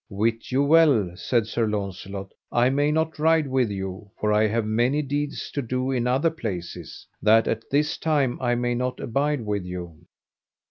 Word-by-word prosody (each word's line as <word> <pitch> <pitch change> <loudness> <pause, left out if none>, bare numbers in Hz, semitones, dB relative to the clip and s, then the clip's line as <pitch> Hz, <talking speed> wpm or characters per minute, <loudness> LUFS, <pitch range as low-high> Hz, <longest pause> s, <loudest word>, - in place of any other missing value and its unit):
Wit 115 +4 -1
you 135 +2 +3
well, 140 - +4
said 115 +5 0
Sir 115 +1 -1
Launcelot, 100 -1 -4 0.2
I 120 +2 +3
may 145 +2 +2
not 160 0 -1
ride 160 0 +3
with 130 -4 +1
you, 95 +1 -5
for 105 0 +1
I 105 +1 +4
have 110 +1 0
many 120 +7 +1
deeds 145 +1 -3
to 140 - -2
do 130 +1 -2
in 125 -2 0
other 135 +6 +2
places, 100 - -6 0.2
that 110 +1 +5
at 115 - -3
this 150 +2 +1
time 145 -6 0
I 120 -1 +1
may 120 0 0
not 125 +1 -2
abide 140 +3 0
with 105 -2 -1
you. 90 -3 -8
120 Hz, 180 wpm, -24 LUFS, 105-140 Hz, 0.2 s, that